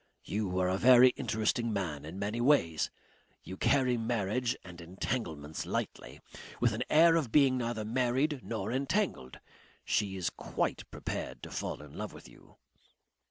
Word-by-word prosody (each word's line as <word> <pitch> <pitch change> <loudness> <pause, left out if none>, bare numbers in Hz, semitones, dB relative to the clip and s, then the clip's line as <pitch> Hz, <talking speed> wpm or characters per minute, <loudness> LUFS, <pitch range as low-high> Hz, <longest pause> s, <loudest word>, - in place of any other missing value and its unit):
You 100 -3 -2
are 90 - +2
a 95 +1 0
very 125 +1 +8
interesting 115 0 -1
man 85 -9 -3
in 80 +4 -8
many 105 +4 -2
ways. 120 - +3 0.5
You 95 - -7
carry 130 +3 +2
marriage 115 +2 -1
and 90 -2 -11
entanglements 85 - -4
lightly. - - -4 0.4
With 120 -2 +2
an 110 - -3
air 165 +2 +6
of 145 -9 0
being 135 -2 +5
neither 115 -2 -2
married 130 +5 +1
nor 110 +4 -3
entangled. 135 - -1 0.5
She 100 -2 0
is 90 - -1
quite - - -3
prepared - - -5
to - - -8
fall - - -4
in 75 - -13
love - - -6
with - - -12
you." - - -19
115 Hz, 155 wpm, -31 LUFS, 95-130 Hz, 0.5 s, very